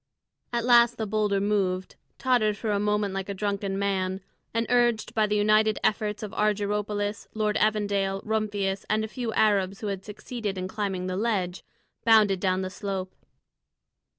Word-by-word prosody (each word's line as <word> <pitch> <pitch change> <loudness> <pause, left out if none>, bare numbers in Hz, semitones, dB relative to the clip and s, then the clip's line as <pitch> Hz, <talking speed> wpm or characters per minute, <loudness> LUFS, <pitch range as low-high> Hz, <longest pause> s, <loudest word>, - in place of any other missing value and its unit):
At 235 -1 -1
last 240 -1 +5
the 220 - -2
boulder 210 -1 +1
moved, 195 -2 0 0.2
tottered 230 -5 +2
for 220 0 -2
a 200 - +1
moment 210 -1 0
like 195 0 -4
a 200 - -3
drunken 200 -1 -2
man, 190 -1 -1 0.3
and, 230 +1 0
urged 240 -2 +2
by 215 -1 +2
the 210 - 0
united 215 +1 +3
efforts 210 -1 0
of 210 0 -6
Argyropoulos, 210 0 -1
Lord 215 -1 0
Evandale, 205 -2 +1
Rumphius, 205 -3 -1
and 215 0 +2
a - - -2
few 235 0 -4
Arabs 195 -3 +2
who 215 - -3
had 195 -1 -8
succeeded 210 -1 -5
in 185 0 -3
climbing 190 -2 -3
the 185 0 -2
ledge, 195 -5 -1 0.4
bounded 215 -4 +5
down 185 0 +1
the 185 - -4
slope. 190 -1 -4
210 Hz, 165 wpm, -26 LUFS, 195-215 Hz, 0.4 s, last